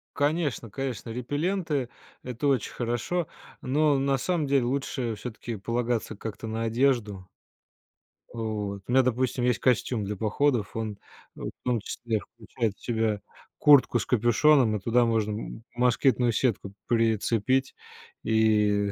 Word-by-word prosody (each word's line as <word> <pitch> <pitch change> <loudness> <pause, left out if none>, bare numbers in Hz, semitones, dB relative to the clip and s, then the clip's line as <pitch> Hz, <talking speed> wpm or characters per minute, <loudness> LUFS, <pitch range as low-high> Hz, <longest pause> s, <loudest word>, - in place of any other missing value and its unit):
Конечно, 145 -5 0
конечно, 125 0 -4
репелленты- 145 - -2 0.3
это 125 +3 -3
очень 135 -6 +1
хорошо, 120 +8 -2 0.3
но 145 +2 +2
на 135 0 +1
самом 170 0 0
деле 135 -3 +2
лучше 130 -2 -2
всё-таки 115 +1 -6
полагаться 115 +2 -2
как-то 110 +2 -7
на 110 +1 -3
одежду. 115 -5 0 1.0
Вот. 105 -3 -4
У - - -4
меня, 130 +1 +5
допустим, 125 0 0
есть 125 -3 +2
костюм 120 -3 +1
для 105 +1 -3
походов, 110 +2 0
он 110 -2 -3 0.4
в - - -5
том 125 -2 +1
числе 110 +1 -3
включает 115 -1 -3
в - - -26
себя 110 -3 0 0.4
куртку 140 -4 +6
с - - -3
капюшоном 120 +1 +4
и - - -2
туда 120 +4 +3
можно 110 -2 +1
м 110 +1 -6
москитную 125 0 +3
сетку 105 -4 -1
прицепить 115 +3 +1 0.5
и 105 -2 +2
120 Hz, 135 wpm, -27 LUFS, 110-130 Hz, 1.0 s, куртку